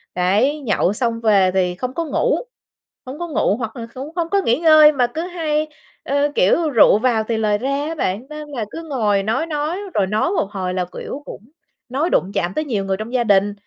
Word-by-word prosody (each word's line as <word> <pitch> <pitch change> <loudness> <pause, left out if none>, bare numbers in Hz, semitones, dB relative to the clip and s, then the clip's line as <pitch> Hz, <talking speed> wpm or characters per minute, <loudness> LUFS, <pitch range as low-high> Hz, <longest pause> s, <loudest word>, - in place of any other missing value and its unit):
đấy, 205 +12 +2
nhậu 205 -6 +1
xong 230 0 -1
về 200 -4 +4
thì 180 -2 +1
không 255 +7 -4
có 335 +2 -2
ngủ, 480 - +1 0.7
hổng 260 +4 -8
có 345 - -3
ngủ, 220 -7 +1
hoặc 225 -3 -5
là 230 -1 -6
cũng 270 +4 -7
hổng 340 -2 -1
có 400 +1 +2
nghỉ 245 -6 +1
ngơi, 310 -2 +7
mà 255 -4 +1
cứ 320 - -2
hay, 320 -4 -2 0.4
ơ, 285 +1 0
kiểu, 310 - +3
rượu 230 -6 +5
vào 230 -2 +1
thì 230 - 0
lời 210 -1 +1
ra 275 +5 -2
á 325 - -4
bạn. 210 -5 -2
Nên 300 0 -8
là 245 -7 -4
cứ 330 - -7
ngồi 210 -7 +1
nói 225 +10 0
nói, 310 +3 -2 0.2
rồi 195 -2 +2
nói 215 - 0
một 385 - 0
hồi 185 -3 -3
là, 185 -1 -1
kiểu, 285 - -6
cũng - - -9 0.5
nói 285 +7 0
đụng 190 - +1
chạm 175 +1 -1
tới 310 - -1
nhiều 210 -8 -2
người 190 0 -1
trong 220 +4 -7
gia 250 -2 +2
đình. 205 -1 +3
250 Hz, 230 wpm, -20 LUFS, 205-305 Hz, 0.7 s, ngơi